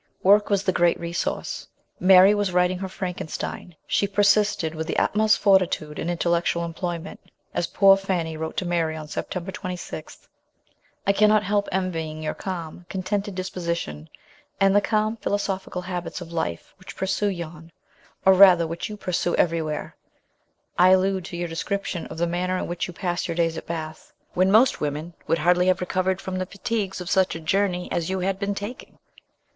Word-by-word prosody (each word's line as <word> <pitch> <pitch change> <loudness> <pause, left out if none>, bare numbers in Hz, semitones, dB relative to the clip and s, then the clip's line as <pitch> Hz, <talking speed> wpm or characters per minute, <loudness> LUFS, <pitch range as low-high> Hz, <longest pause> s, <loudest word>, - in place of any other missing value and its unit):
Work 205 +2 +5
was 200 -1 +2
the 190 - +2
great 175 -1 +2
resource. 170 +2 -3 0.3
Mary 190 +2 +7
was 205 -2 0
writing 180 0 +2
her 190 0 -4
Frankenstein. 180 -2 -5
She 200 - +1
persisted 205 -4 +2
with 160 0 -4
the - - -2
utmost 215 +1 +3
fortitude 185 -6 +2
in 170 - -2
intellectual 170 0 0
employment, 170 +1 -5 0.3
as 175 - -1
poor 195 -1 +6
Fanny 180 -5 -2
wrote 160 0 -5
to 185 - -1
Mary 165 -2 0
on 155 -1 -7
September 180 +4 -4
26: 180 -2 -7 0.4
" 290 +1 -39
I 200 - +4
cannot 210 +1 +4
help 205 0 0
envying 165 -4 -2
your 155 - -2
calm, 175 -2 -6
contented 195 +1 -2
disposition, 170 - -4 0.5
aud 195 0 +4
the 205 - +5
calm 215 +1 0
philosophical 195 -3 -2
habits 180 -1 -4
of 170 -2 -9
life 85 - -3
which - - -11
pursue 200 +2 0
you; 170 -3 -7 0.6
or, 190 - +8
rather, 185 -3 +7
which 165 +6 -4
you 210 - -7
pursue 175 -3 -1
everywhere; 160 -3 -1 0.8
I 180 +1 +7
allude 190 -1 +3
to 175 - -6
your 175 0 -2
description 175 +1 -3
of - - -9
the 170 - +1
manner 180 +2 -1
in - - -2
which 175 0 -3
you - - -7
pass 175 -2 -2
your 170 - -3
days 165 -1 +1
at - - -7
Bath, 160 -2 -6 0.2
when 185 +1 +3
most 230 +6 +4
women 150 +3 -3
would 165 - +2
hardly 180 +3 +3
have 185 - +3
recovered 185 +1 0
from 185 -1 -4
the 185 - -3
fatigues 200 -2 -3
of 180 - -6
such 190 -3 +2
a - - -5
journey 180 +2 0
as 170 0 -1
you 190 0 -1
had 195 +1 -1
been 200 0 -1
taking." 205 +5 -7
180 Hz, 180 wpm, -24 LUFS, 170-195 Hz, 0.8 s, or